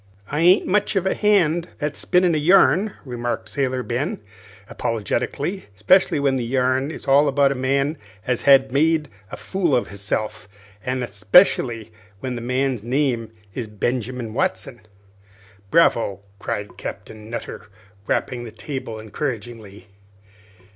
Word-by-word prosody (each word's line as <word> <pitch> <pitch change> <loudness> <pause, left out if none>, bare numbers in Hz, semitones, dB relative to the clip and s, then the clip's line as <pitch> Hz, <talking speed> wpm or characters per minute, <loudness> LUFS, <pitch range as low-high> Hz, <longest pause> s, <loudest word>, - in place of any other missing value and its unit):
"I 145 - -1
ain't 180 +4 +5
much 205 +2 +1
of 190 -1 +1
a 190 - +2
hand 175 -5 +2
at 150 -1 -2
spinnin' 180 -1 +2
a 155 - +1
yarn," 195 +5 +4
remarked 120 -2 -4
Sailor 130 -3 -1
Ben, 125 +5 -2 0.5
apologetically, 140 - -2
"'specially 145 - +3
when 140 -2 +1
the 125 - -2
yarn 130 +2 +1
is 160 - -8
all 140 +2 +5
about 140 0 +3
a - - +1
man 140 +3 0 0.3
as 125 -2 0
has 135 -1 +5
made 155 +2 +2 0.2
a - - -6
fool 180 -7 0
of 120 - 0
hisself, 100 0 -4 0.3
an' 125 0 -2
'specially 115 - +3 0.3
when 130 +2 -4
that 120 - -5
man's 125 -1 -1
name 120 -3 0 0.2
is 115 +1 -4
Benjamin 120 +2 -3
Watson." 135 - -2 0.9
"Bravo!" 115 - +3 0.2
cried 105 0 -5
Captain 110 0 -8
Nutter, 115 - -6 0.4
rapping 125 - -1
on 120 - -7
the 115 - -8
table 115 0 -6
encouragingly. 110 -3 -6
130 Hz, 140 wpm, -22 LUFS, 115-150 Hz, 0.9 s, ain't